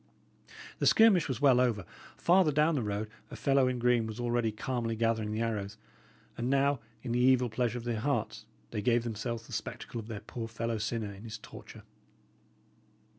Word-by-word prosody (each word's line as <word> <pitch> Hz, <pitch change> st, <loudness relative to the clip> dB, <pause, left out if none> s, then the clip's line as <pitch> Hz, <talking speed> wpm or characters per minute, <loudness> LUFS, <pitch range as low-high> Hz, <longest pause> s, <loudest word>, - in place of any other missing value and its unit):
The -, -, +2 dB
skirmish 215 Hz, -7 st, +6 dB
was 130 Hz, +1 st, -3 dB
well 135 Hz, -4 st, +6 dB
over; 115 Hz, -7 st, +1 dB, 0.3 s
farther 175 Hz, -2 st, +4 dB
down 150 Hz, +3 st, +3 dB
the 140 Hz, -, 0 dB
road, 105 Hz, 0 st, -2 dB, 0.2 s
a -, -, -8 dB
fellow 135 Hz, -2 st, +3 dB
in 125 Hz, -1 st, 0 dB
green 120 Hz, -2 st, +2 dB
was 110 Hz, +1 st, -7 dB
already 120 Hz, -2 st, 0 dB
calmly 115 Hz, +1 st, -2 dB
gathering 110 Hz, -1 st, 0 dB
the 110 Hz, +1 st, -2 dB
arrows; 105 Hz, -2 st, -3 dB, 0.6 s
and 120 Hz, +2 st, -2 dB
now, 140 Hz, 0 st, +2 dB, 0.2 s
in 125 Hz, -, -4 dB
the 120 Hz, -, +1 dB
evil 125 Hz, -1 st, +4 dB
pleasure 120 Hz, +1 st, 0 dB
of 120 Hz, -, -6 dB
their 115 Hz, -2 st, -2 dB
hearts, 140 Hz, +5 st, -2 dB, 0.2 s
they 105 Hz, -, -2 dB
gave 120 Hz, 0 st, +2 dB
themselves 115 Hz, 0 st, -4 dB
the -, -, -11 dB
spectacle 115 Hz, -, -5 dB
of 110 Hz, -, -8 dB
their 110 Hz, -3 st, -6 dB
poor 115 Hz, -2 st, -6 dB
fellow 115 Hz, 0 st, -3 dB
sinner 110 Hz, -1 st, -3 dB
in 100 Hz, +2 st, -12 dB
his 110 Hz, -2 st, -6 dB
torture. -, -, -12 dB
120 Hz, 185 wpm, -31 LUFS, 110-130 Hz, 0.6 s, skirmish